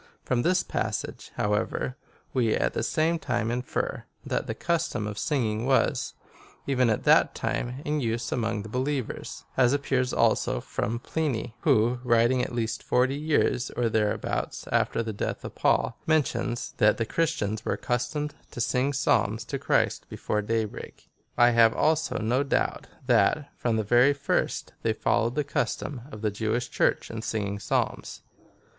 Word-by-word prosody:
From 125 -1 +1
this 180 +6 +2
passage, - - -3
however, 105 +4 -1 0.4
we 120 -4 +2
at - - 0
the - - -1
same 165 +2 +1
time 120 -6 -1
infer, 125 +1 -2 0.2
that - - -2
the - - -3
custom 170 -10 -1
of 105 -1 -4
singing 115 -6 0
was, 135 - +1 0.5
even 130 -3 +2
at 110 - 0
that - - +5
time, 125 +4 -3
in 150 0 0
use 120 0 -2
among 115 -3 -1
believers, 130 +3 -3
as 125 0 +5
appears, 130 -3 0
also, - - +2
from 115 +3 -3
Pliny, 125 -4 -2
who, 120 +3 +3
writing 120 +1 +3
at - - -2
least 115 -1 -2
forty 125 +2 +2
years, 145 -4 +1
or 120 -1 +2
thereabouts, 105 -2 -1
after 115 - +1
the 110 -1 -4
death 100 - -3
of - - -6
Paul, - - +1
men 155 -1 +5
tions, 120 -1 -3
that 105 0 +4
the 115 - 0
Christians 110 -7 -1
were - - 0
accustomed 125 +5 -2 0.2
to - - -9
sing 125 +4 +1
Psalms 135 - +1
to - - -4
Christ - - +1
before 105 - -2
day 110 +1 0
break.^ 105 - -10 0.3
I 120 0 +6
have 115 -1 +5
also 160 +1 +1
no 120 +5 +1
doubt, 140 - 0 0.2
that, 150 -2 +3
from 120 -2 0
the 110 - +1
very 120 +6 +5
first, 140 0 -1
they - - +1
followed 115 +2 +1
the 150 - +1
custom 140 -1 -2
of 110 -4 -9
the 105 - +1
Jewish 110 +4 -2
Church - - +1
in 110 -1 -5
singing 100 -3 -2
Psalms, - - -2
i - - -30
16. - - -33
120 Hz, 165 wpm, -27 LUFS, 110-140 Hz, 0.5 s, I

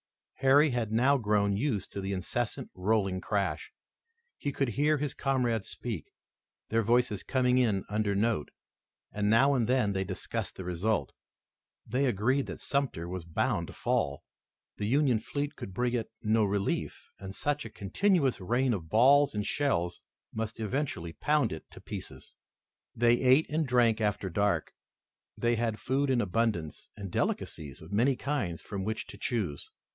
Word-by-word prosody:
Harry 140 +3 +5
had 120 -3 -1
now 130 +6 +4
grown 105 -5 +2
used 110 -3 -1
to 100 - -4
this 95 +1 -3
incessant, 105 +5 -3
rolling 95 -1 0
crash. 100 -2 -1 0.7
He 145 - -2
could 135 -2 0
hear 150 +6 +2
his 145 -1 -2
comrades 120 -6 0
speak, - - -5 0.6
their 115 +1 +2
voices 115 -2 +2
coming 125 -1 +2
in 115 -5 +3
an 95 - -4
under 105 -1 0
note, 105 -6 +1 0.6
and 105 0 0
now 135 +6 +5
and 120 -5 +1
then 125 -6 +2
they 95 0 0
discussed 95 -1 -4
the 95 - -6
result. 90 +5 -1 0.7
They 130 +5 +1
agreed 130 +5 +1
that - - -6
Sumter 135 - -1
was 90 -1 -5
bound 85 - 0
to - - -10
fall. 70 0 -1 0.5
The 105 - -2
Union 130 -2 +3
fleet 145 +5 -3
could 95 - -7
bring 125 +2 0
it 115 -3 -1
no 110 0 +3
relief, 100 0 -2
and 95 0 -7
such 145 0 -1
a 115 - -7
continuous 135 - +1
rain 120 +6 +1
of 85 -6 -5
balls 135 - +5
and 105 -1 -1
shells 90 -12 0 0.3
must 110 0 -4
eventually 110 - -2
pound 150 - +1
it 80 - -9
to - - -13
pieces. - - -8 0.6
They 120 +1 +4
ate 130 +4 +5
and 155 -1 0
drank 120 -3 +3
after 105 -3 0
dark. 100 -3 0 0.6
They 120 0 +1
had 115 -2 -1
food 140 +2 0
in 125 -2 +3
abundance 100 -6 -1
and 100 -3 -6
delicacies 75 -5 -3
of - - -12
many 125 +6 +3
kinds 125 - -2
from 100 -2 -4
which 110 +2 -3
to - - -12
choose. 100 - -2
115 Hz, 165 wpm, -30 LUFS, 100-130 Hz, 0.7 s, Harry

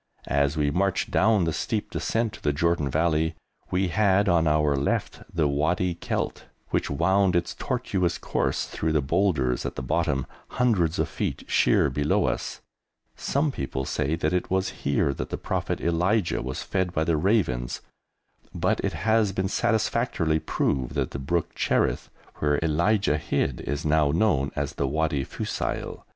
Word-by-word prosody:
As 70 +2 +1
we 75 -1 +2
marched 95 +4 0
down 105 -2 +3
the 80 -1 0
steep 95 +6 -2
descent 115 -2 -1
to - - -11
the 75 - +1
Jordan 85 -1 +1
Valley 80 +1 +1 0.3
we 95 0 +1
had 100 +1 +3
on 85 -3 +3
our 75 -1 +3
left 70 +1 -1
the 80 -3 +1
Wadi 80 +6 +1
Kelt, 85 - -3 0.3
which - - 0
wound 95 -1 +2
its 85 0 0
tortuous 100 -9 -1
course - - -1
through 80 0 -2
the 75 - +3
boulders 70 -5 +1
at - - -4
the 65 - -4
bottom, 65 +1 0 0.3
hundreds 95 -10 +2
of - - +1
feet - - -3
sheer 70 - +3
below 75 +3 +1
us. - - -3 0.5
Some 145 +2 0
people 65 - -3
say 75 +4 -1
that 80 +1 -1
it 90 - 0
was 95 0 +1
here 70 0 +1
that - - -5
the - - -3
Prophet - - -2
Elijah 85 +2 +1
was 65 +1 -4
fed 95 -2 -1
by 80 - +1
the 80 0 +1
ravens, 75 - 0 0.7
but - - +1
it - - -1
has 110 0 +2
been 95 0 0
satisfactorily 110 -9 +1
proved 65 -4 -1
that - - -1
the 70 - -5
brook 80 +5 -1
Cherith, - - 0 0.3
where 75 -1 +1
Elijah 85 +1 +2
hid, 65 -4 -1
is 75 +3 -2
now 75 -1 +3
known 75 -5 +2
as - - -2
the 70 - -1
Wadi 75 -1 0
Fusail. - - -4
80 Hz, 165 wpm, -26 LUFS, 75-95 Hz, 0.7 s, down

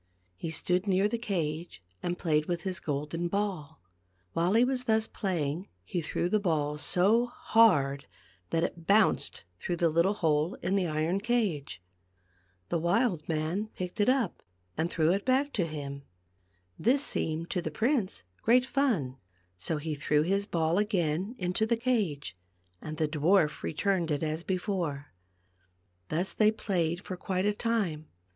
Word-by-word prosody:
He 160 - -5
stood 180 +5 0
near 195 +1 +3
the 235 +2 -2
cage 165 - -3 0.2
and 175 0 -2
played 155 -3 +1
with 175 -1 -2
his 185 -2 -3
golden 150 +4 -2
ball. 185 - -3 0.5
While 175 +3 +1
he 235 - +6
was 255 -1 -1
thus 220 -1 +2
playing 175 -4 -2 0.2
he 170 - -3
threw 165 +2 -1
the 215 +4 +2
ball 150 -6 0
so 210 +10 +3
hard 145 - +3 0.4
that 165 - +1
it 170 -1 -4
bounced 210 +1 +3 0.2
through 175 - -2
the 170 -1 +2
little 170 +6 +3
hole 160 -1 +1
in 185 +3 +1
the 190 -3 +1
iron 160 +4 0
cage. 195 - -1 0.9
The 170 - 0
wild 175 -1 +1
man 165 +7 -1
picked 180 +3 -5
it 205 - +4
up 255 -8 +1 0.4
and 160 +2 0
threw 160 -2 +2
it 200 +2 0
back 270 +3 +1
to 175 -5 0
him. 140 -3 -6 0.8
This 270 +5 +3
seemed 160 +2 -2
to 180 - 0
the 160 - -3
prince 220 - 0 0.2
great 250 +2 +4
fun, 225 - 0 0.4
so 120 - -2
he 155 +1 -3
threw 150 +1 +1
his 200 +4 0
ball 165 +2 +1
again 190 0 0
into 185 +3 0
the 235 0 +2
cage, 210 - -1 0.5
and 155 0 -6
the 155 - +1
dwarf 155 +1 +2
returned 175 +1 0
it 150 +1 0
as 155 +1 -1
before. 175 - -3 1.0
Thus 175 +5 -1
they 215 -1 +4
played 175 -5 -1
for 185 - -5
quite 185 +1 -2
a 210 - +2
time. 205 -9 -1
175 Hz, 160 wpm, -29 LUFS, 155-205 Hz, 1.0 s, he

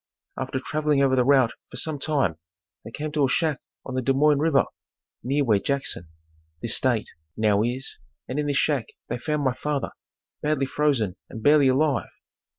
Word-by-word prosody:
After 130 0 -3
traveling 150 0 +1
over 130 -1 +3
the 125 - +4
route 130 -3 +4 0.2
for - - -7
some 155 -3 -1
time 135 - 0 0.4
they - - -8
came 150 +6 -5
to 150 -2 +2
a - - 0
shack 155 0 +1 0.3
on 130 - -6
the 130 - 0
Des 135 +2 +2
Moines 145 +1 +4
river, 155 -2 +3 0.6
near 140 +3 +1
where 110 -6 +3
Jackson, 135 - -2 0.5
this - - -1
state, - - +1 0.3
now 105 -2 +3
is 125 +4 -3 0.3
and 130 +4 -3
in 150 - -1
this 145 -1 +1
shack 140 -6 +1 0.2
they 120 - -2
found 150 +1 -1
my 130 -2 +2
father, 140 +2 -2 0.5
badly 150 -2 +1
frozen 130 -10 0
and 110 - -8
barely 145 -1 +6
alive. 135 0 +2
135 Hz, 180 wpm, -25 LUFS, 125-150 Hz, 0.6 s, barely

